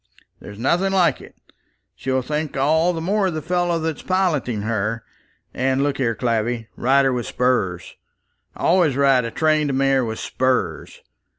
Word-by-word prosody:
There's 100 - -11
nothing 175 - +1
like 175 -7 +2
it. - - -14 0.6
She'll 130 0 -2
think 150 +1 -3
all 160 +6 +2
the 165 - -4
more 195 +3 +1
of 175 - -3
the 155 - -3
fellow 175 0 0
that's 160 -1 -3
piloting 155 - 0
her. 110 0 -2 0.5
And 130 +1 0
look 145 -1 -1
here, 115 -4 0
Clavvy; 115 -1 -1
ride 135 +2 +3
her 135 - +2
with 120 -1 -3
spurs. 110 -9 -1 0.6
Always 170 -6 +2
ride 135 -3 +3
a - - -3
trained 155 +1 +1
mare 135 -1 +2
with 110 -1 -4
spurs. 130 0 -2
135 Hz, 160 wpm, -21 LUFS, 120-160 Hz, 0.6 s, ride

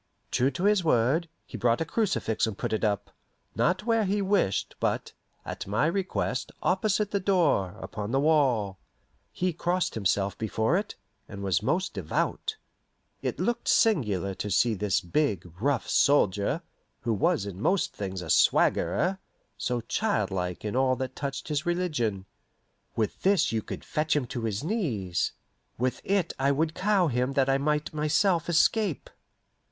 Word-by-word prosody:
True 130 +2 +2
to 140 +7 -5
his 205 -2 +3
word, 155 +4 +2 0.2
he 120 - -8
brought 115 +1 +2
a 165 - -1
crucifix 170 - 0
and 105 -3 -5
put - - -3
it 110 - -1
up 100 -2 0 0.4
not 185 +5 +1
where 225 -2 +2
he 200 +2 0
wished, 195 - +1
but, - - -1 0.3
at - - -6
my 105 +8 +1
request, 190 +3 -1
opposite 210 -1 +1
the 200 - +1
door, 165 - +2
upon 105 -1 -5
the 135 +3 +1
wall. 130 -11 +2 0.5
He 180 -1 -1
crossed 175 +2 0
himself 100 -1 0
before 110 - 0
it, 205 +2 -2 0.3
and 100 -1 -7
was 95 -4 +1
most 185 +2 0
devout. 440 -2 -2 0.6
It - - -3
looked 240 0 -1
singular 105 - +2
to 105 - -4
see 115 +4 +3
this 100 -1 0
big, 95 - 0 0.2
rough 135 -4 +1
soldier, 110 - +2 0.4
who 115 - 0
was 100 -1 +1
in 100 -1 -7
most 190 +9 +1
things 95 -2 -5
a 80 - -3
swaggerer, 190 +2 +3 0.4
so 125 -1 -2
childlike 95 - -1
in 105 - -2
all 130 0 +3
that 130 0 -5
touched 140 -1 -4
his 150 -1 -1
religion. 145 - -1 0.7
With 110 -2 -2
this 195 0 +3
you 110 -1 0
could - - -8
fetch 155 0 0
him 145 -4 +1
to 120 -1 -4
his 110 +3 -2
knees; 120 - -1 0.4
with 125 +2 -1
it 195 -4 0
I 135 +1 +3
would 155 +3 0
cow 195 0 +2
him 125 -2 0
that 135 -1 +2
I 135 0 +3
might 150 +2 0
myself 165 +3 +1
escape. 180 - +2
135 Hz, 160 wpm, -27 LUFS, 105-180 Hz, 0.7 s, his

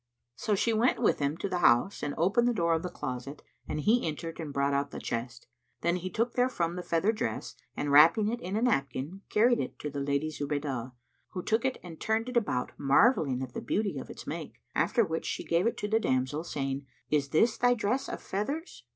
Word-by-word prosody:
So 210 - 0
she 225 +3 +1
went 230 +4 +3
with 235 - +2
him 145 +2 0
to 200 - -2
the 180 -2 -1
house 120 +5 +4
and 145 -1 -3
opened 195 +9 +3
the 240 - +1
door 170 -4 +2
of 160 - +1
the 180 - -4
closet, 140 -2 -6 0.2
and - - -3
he 225 +3 +3
entered 165 +2 -5
and 155 -3 -5
brought 140 0 +1
out 140 0 0
the - - -7
chest. 120 +1 -4 0.4
Then 170 +1 +1
he 185 +1 -4
took 230 +6 -1
therefrom 215 -10 +1
the 180 - -3
feather 175 +4 +1
dress 115 - -3 0.2
and 145 - -1
wrapping 165 +9 +7
it 235 +2 -2
in 190 -1 -4
a 225 - 0
napkin, 155 - -1
carried 235 +3 +4
it - - -4
to 150 - -5
the 140 - -4
Lady 140 +2 0
Zubaydah, 140 -4 -3 0.4
who 180 - -4
took 225 +3 +1
it 265 - 0
and 165 -3 -10
turned 220 +2 0
it 250 - -7
about, 205 - 0
marvelling 140 - +3
at 125 -2 -7
the - - -4
beauty 205 - -1
of - - -9
its - - -9
make; - - -5 0.2
after 230 -3 +2
which 160 -2 -3
she - - -3
gave 170 +5 +2
it 235 - -1
to 210 - -2
the 220 +2 +2
damsel, 130 -2 0
saying, 135 -4 -3 0.2
"Is 145 -2 +2
this 220 +10 +3
thy 245 0 +4
dress 245 +5 -1
of - - -6
feathers?" 280 - -4
170 Hz, 225 wpm, -29 LUFS, 140-220 Hz, 0.4 s, wrapping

